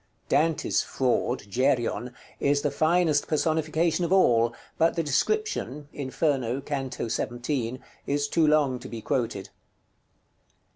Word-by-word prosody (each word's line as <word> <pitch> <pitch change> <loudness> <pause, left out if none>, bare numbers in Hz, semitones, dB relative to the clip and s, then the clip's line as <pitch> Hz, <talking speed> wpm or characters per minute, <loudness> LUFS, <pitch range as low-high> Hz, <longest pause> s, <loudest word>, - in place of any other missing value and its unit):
Dante's 160 +1 +2
Fraud, 125 -1 0
Geryon, 125 +1 0 0.2
is 145 0 +2
the 145 - +1
finest 155 0 +2
personification 160 +2 +1
of 170 - -1
all, 120 -11 +4 0.3
but 165 +1 +3
the 165 - 0
description 150 - -1
(Inferno, 135 -3 -1
canto 135 -4 -4
XVII.) 120 +2 -2 0.3
is 145 0 0
too 160 +1 +2
long 145 -4 +3
to - - -9
be 115 - -6
quoted. 115 -7 -2
145 Hz, 115 wpm, -26 LUFS, 125-155 Hz, 0.3 s, all